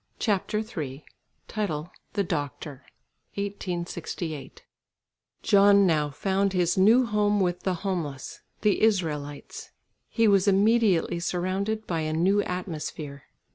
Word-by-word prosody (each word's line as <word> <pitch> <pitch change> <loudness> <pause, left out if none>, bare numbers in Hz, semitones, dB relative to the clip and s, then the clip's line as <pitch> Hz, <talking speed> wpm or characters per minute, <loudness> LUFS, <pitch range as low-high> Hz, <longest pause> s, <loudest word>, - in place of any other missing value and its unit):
CHAPTER 210 0 0
III 150 - -6 0.4
THE 200 0 -3
DOCTOR 145 -4 -4 0.5
(1868) 175 -6 -5 0.8
John 200 0 +6
now 155 -4 +2
found 195 +6 0
his 180 -2 +2
new 225 +7 +5
home 210 -1 +1
with 180 -2 0
the 190 -2 -1
homeless, 155 -9 -4 0.2
the 210 -2 +2
Israelites. 150 -9 -1 0.4
He 230 -2 +2
was 200 -1 +4
immediately 200 -4 +3
surrounded 190 +5 -2
by 165 -2 -2
a 155 0 -2
new 190 +6 +3
atmosphere. 155 -6 -5
185 Hz, 105 wpm, -26 LUFS, 160-205 Hz, 0.8 s, John